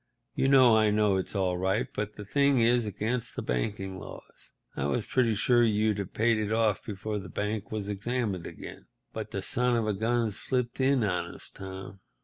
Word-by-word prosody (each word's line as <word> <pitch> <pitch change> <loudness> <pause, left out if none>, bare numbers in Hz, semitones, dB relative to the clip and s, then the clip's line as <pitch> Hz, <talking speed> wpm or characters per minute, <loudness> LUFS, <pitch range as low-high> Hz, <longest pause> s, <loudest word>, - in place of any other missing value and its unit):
You - - +1
know 130 -4 +7
I 110 -1 +4
know 105 -2 +3
it's 95 - -3
all 90 -2 0
right, 95 +5 +1
but 105 0 -3
the 105 - -9
thing 140 +4 +3
is 120 0 +3
against 110 +4 -2
the - - -4
banking 95 - -2
laws. - - -12 0.2
I 70 - -2
was 105 +10 -1
pretty 120 -4 +2
sure 120 +4 +3
you'd 105 -2 +2
have 100 - -4
paid 115 0 +3
it 105 -1 -2
off 110 -2 +1
before 105 0 -4
the 95 -2 -9
bank 105 +3 -3
was 105 -2 -3
examined 105 -2 -2
again, - - -10 0.3
but - - -5
the - - -4
son 125 0 +1
of 115 -2 +1
a 105 - 0
gun 115 +2 0
slipped 125 +4 -2
in 130 -2 +3
on 90 -4 -2
us, - - -7
Tom. 95 0 -9
105 Hz, 200 wpm, -28 LUFS, 100-120 Hz, 0.3 s, know